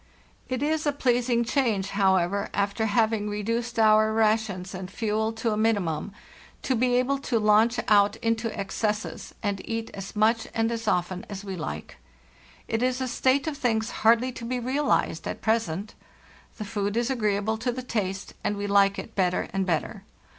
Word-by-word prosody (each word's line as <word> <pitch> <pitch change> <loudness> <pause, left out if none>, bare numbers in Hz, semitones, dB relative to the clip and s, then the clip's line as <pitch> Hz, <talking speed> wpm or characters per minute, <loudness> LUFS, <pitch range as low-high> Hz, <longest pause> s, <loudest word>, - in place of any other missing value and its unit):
"It 255 +1 -1
is 315 +1 0
a - - +4
pleasing 245 -3 +1
change, 225 -7 0
however, 195 0 +2
after 200 +3 0
having 220 -1 +1
re 210 0 -3
duced 235 +2 -2
our 215 0 +5
rations 215 -4 +1
and 185 0 -6
fuel 220 +1 -1
to 225 0 -1
a 210 - -1
minimum 205 -6 0 0.5
to 260 - +1
be 245 +1 +2
able 260 +2 +1
to 255 -3 -1
launch 215 +2 +4
out 205 0 +5
into 230 0 -1
excesses, 210 +2 -3
and 200 -2 -1
eat 225 0 -4
as 195 +1 -8
much 225 +2 +2
and 225 0 +1
as 230 -1 -4
often 180 -1 0
as 200 -1 -7
we 195 -1 -4
like. 80 - -6 0.7
It 225 0 -1
is 255 0 +1
a 260 - -1
state 260 +2 +2
of 310 -3 -3
things 225 -4 0
hardly 235 +3 +4
to 240 - -9
be 250 +2 -2
realized 265 +5 0
at - - -4
present. 215 -4 -1 0.6
The 215 - -5
food 205 0 -2
is 240 +2 +1
agreeable 215 -2 0
to 245 +2 0
the 255 +1 -5
taste, 195 -5 -3
and 205 - -1
we 205 - -3
like 200 0 +4
it 225 - -7
better 180 -2 0
and 195 -1 0
better. 165 -4 -2
220 Hz, 180 wpm, -26 LUFS, 200-235 Hz, 0.7 s, our